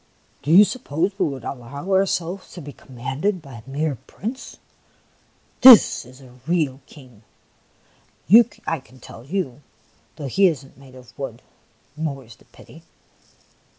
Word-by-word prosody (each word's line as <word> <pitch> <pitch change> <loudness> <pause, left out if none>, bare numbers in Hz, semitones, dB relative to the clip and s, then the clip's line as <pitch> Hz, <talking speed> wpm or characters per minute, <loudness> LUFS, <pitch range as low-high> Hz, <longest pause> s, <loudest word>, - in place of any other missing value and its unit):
" - - -38
Do - - -6
you 190 +5 +9
suppose 185 - -2
we 185 - +2
would 135 -4 -6
allow 140 - -7
ourselves 190 -1 0
to 175 - -9
be 145 -1 -10
commanded 135 - -4
by 135 -6 -12
a 130 - -16
mere 145 -1 -2
Prince? 245 +6 -7 1.0
This 255 - +8
is 130 +2 -16
a 125 -1 -17
real 155 -6 0
King, 125 -7 -16 1.4
I 165 - -1
can 130 -1 -20
tell 115 - -12
you, 145 -3 -4 0.5
though 150 - -7
he 190 +9 +3
is 150 -6 -2
n't 135 - -20
made 135 -2 -16
of 125 -2 -15
wood, 125 -4 -6 0.5
more 140 -5 -5
's 110 - -14
the - - -25
pity - - -17
140 Hz, 150 wpm, -22 LUFS, 130-180 Hz, 1.4 s, you